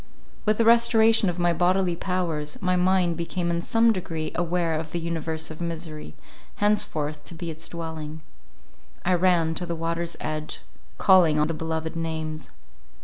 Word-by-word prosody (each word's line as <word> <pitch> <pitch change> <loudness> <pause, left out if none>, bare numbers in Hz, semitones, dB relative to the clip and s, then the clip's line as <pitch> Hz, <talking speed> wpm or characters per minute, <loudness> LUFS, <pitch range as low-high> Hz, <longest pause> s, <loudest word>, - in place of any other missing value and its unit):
With 215 0 +2
the 230 - +2
restoration 225 -2 +5
of 175 - -3
my 175 -1 +2
bodily 180 0 +2
powers, 170 -5 -2
my 185 0 +1
mind 180 -1 +2
became 170 +1 -2
in 170 0 0
some 225 +4 +3
degree 165 -5 -4
aware 175 -1 0
of 155 0 -4
the 175 - -1
universe 160 -1 -3
of 155 - -9
misery, 160 - -5 0.4
henceforth 155 -8 0
to 170 - -9
be 170 0 -5
its 160 +1 -3
dwelling. 160 -2 -6 0.8
I 180 - +3
ran 175 -2 +3
to 175 +2 -3
the 170 - -2
water's 165 +1 -2
edge, 155 0 -3 0.4
calling 180 -6 +5
on 150 - +3
the 165 - -2
beloved 160 0 -3
names. 160 -1 -4
170 Hz, 160 wpm, -25 LUFS, 160-180 Hz, 0.8 s, restoration